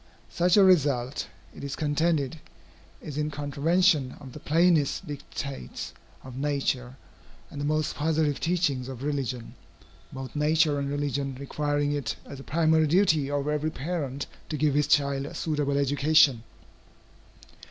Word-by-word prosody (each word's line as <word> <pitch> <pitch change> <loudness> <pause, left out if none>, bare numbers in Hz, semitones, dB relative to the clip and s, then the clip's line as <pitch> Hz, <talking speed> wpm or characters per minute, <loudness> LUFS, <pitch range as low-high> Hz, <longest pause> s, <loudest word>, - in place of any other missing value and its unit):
Such 180 +2 +3
a 200 - +8
result, 145 -8 +2 0.3
it - - -10
is 140 -1 -4
contended, 155 -1 0 0.6
is 150 -1 -5
in 150 0 0
contravention 145 +1 +1
of 135 -4 -11
the - - -8
plainest 165 +2 +2
dictates 140 - -6 0.3
of 130 -2 -10
nature 135 -3 -1 0.6
and 145 - -6
the - - -1
most 155 0 0
positive 155 -1 0
teachings 155 -7 0
of 130 -1 -7
religion, 130 -5 -3 0.6
both 130 +1 -7
nature 150 0 +2
and 140 0 -2
religion 140 -2 -2
requiring 145 +1 -1
it 145 -6 -2
as 140 - -9
a - - -9
primary 160 0 +3
duty 160 -4 +3
of 145 0 -1
every 150 +1 0
parent 145 -3 -3 0.2
to 155 - -2
give 150 0 +2
his 145 0 +2
child 140 -1 +2
a - - -9
suitable 145 -3 -1
education. 140 -2 +4
145 Hz, 140 wpm, -27 LUFS, 140-155 Hz, 0.6 s, a